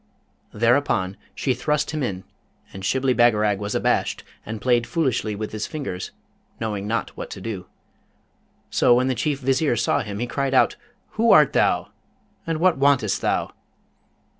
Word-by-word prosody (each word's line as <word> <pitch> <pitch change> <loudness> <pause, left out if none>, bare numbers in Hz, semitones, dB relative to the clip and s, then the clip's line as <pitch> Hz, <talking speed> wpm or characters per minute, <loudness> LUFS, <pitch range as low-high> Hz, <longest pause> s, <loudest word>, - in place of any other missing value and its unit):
Thereupon 115 -5 +1 0.2
she 130 - 0
thrust 145 +6 -1
him 155 -1 -3
in; 95 -7 -3 0.5
and 95 - -8
Shibli 130 +5 +1
Bagarag 105 -4 +3
was 105 0 -3
abashed, - - 0 0.2
and 110 0 -6
played 120 0 +2
foolishly 130 -10 -1
with 105 +1 -5
his 110 0 -4
fingers, 135 -12 -5 0.5
knowing 105 -3 -3
not 115 +2 -2
what - - -7
to - - -8
do. 105 -5 -6 1.0
So 120 - +4
when 130 +2 +2
the - - +2
Chief 140 +2 -1
Vizier 135 0 +1
saw 120 +5 +1
him 105 -6 -5
he 120 - -2
cried 135 +2 -1
out, - - +4 0.4
'Who 230 +1 +4
art 150 -3 +6
thou, - - +2 0.6
and 165 -1 -1
what 180 -4 +3
wantest 135 -7 +2
thou?' - - 0
120 Hz, 160 wpm, -23 LUFS, 105-140 Hz, 1.0 s, art